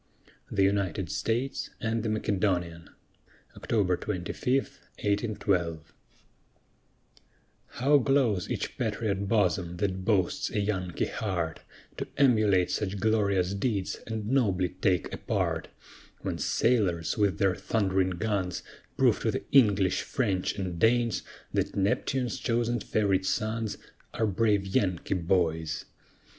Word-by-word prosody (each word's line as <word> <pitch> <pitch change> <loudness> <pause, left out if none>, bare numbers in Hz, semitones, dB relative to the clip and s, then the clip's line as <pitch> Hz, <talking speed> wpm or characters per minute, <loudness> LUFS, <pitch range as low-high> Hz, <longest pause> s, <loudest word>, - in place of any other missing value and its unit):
THE 100 - +2
UNITED 100 -3 0
STATES 120 +4 -1
AND 115 0 -1
THE 110 - -2
MACEDONIAN 90 -6 -1 0.7
[October 100 -5 +1
25, 95 +9 -2 0.4
1812] 100 -6 -1 1.7
How 140 +4 +3
glows 125 -9 +2
each - - -4
patriot 100 -3 -1
bosom 90 -4 +1
that 95 -1 -1
boasts 95 -4 +1
a - - -1
Yankee 95 -4 -1
heart, 90 -6 -3 0.4
To - - -4
emulate 110 -9 +4
such 100 -1 -2
glorious 100 -3 +2
deeds 100 -2 -1
and 110 -2 -4
nobly 100 -8 +2
take 95 0 0
a - - -3
part; - - -1 0.5
When - - -3
sailors 95 -9 +1
with 100 -6 +1
their 95 +1 +3
thund'ring 95 -4 0
guns, 100 -4 -1 0.3
Prove - - +4
to - - 0
the - - -2
English, 100 -8 +4
French, 100 -10 -1
and 90 -3 -3
Danes 115 +1 +3 0.3
That - - -1
Neptune's 115 +5 0
chosen 120 0 0
fav'rite 95 -3 +1
sons 110 +2 -1 0.4
Are 110 - +1
brave 105 -1 +2
Yankee 95 -2 0
boys. 80 -3 0
100 Hz, 115 wpm, -28 LUFS, 90-110 Hz, 1.7 s, emulate